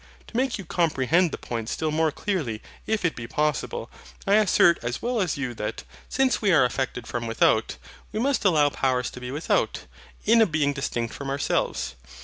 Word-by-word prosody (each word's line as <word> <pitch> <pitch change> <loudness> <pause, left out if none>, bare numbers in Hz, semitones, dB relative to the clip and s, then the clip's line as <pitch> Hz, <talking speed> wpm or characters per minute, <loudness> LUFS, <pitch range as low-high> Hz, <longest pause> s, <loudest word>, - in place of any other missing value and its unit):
To - - -15
make 260 +1 +1
you 195 - -8
comprehend 165 +1 +2
the - - -4
point 115 -2 -5
still 155 -1 -1
more 160 +1 +2
clearly 145 - -3 0.2
if 220 -4 0
it 165 - +1
be 115 -1 -6
possible, 150 -1 -1 0.4
I 195 - +2
assert 200 -5 +5
as 120 +1 -3
well 240 -2 -1
as 175 -7 -1
you 130 -3 -3
that, 105 -2 -4 0.3
since 265 -1 +1
we 205 -3 +3
are 150 -7 +6
affected 125 -1 -2
from 120 -1 -4
without, 110 -1 +2 0.3
we 215 - -3
must 275 +3 +1
allow 155 -7 +4
Powers 130 -2 0
to - - -9
be 125 - -5
without, 145 +5 0 0.4
in 230 +2 +6
a 220 - +5
Being 150 -4 +1
distinct 120 -4 -3
from 140 -1 -6
ourselves. 140 +1 -1
150 Hz, 190 wpm, -25 LUFS, 125-195 Hz, 0.4 s, are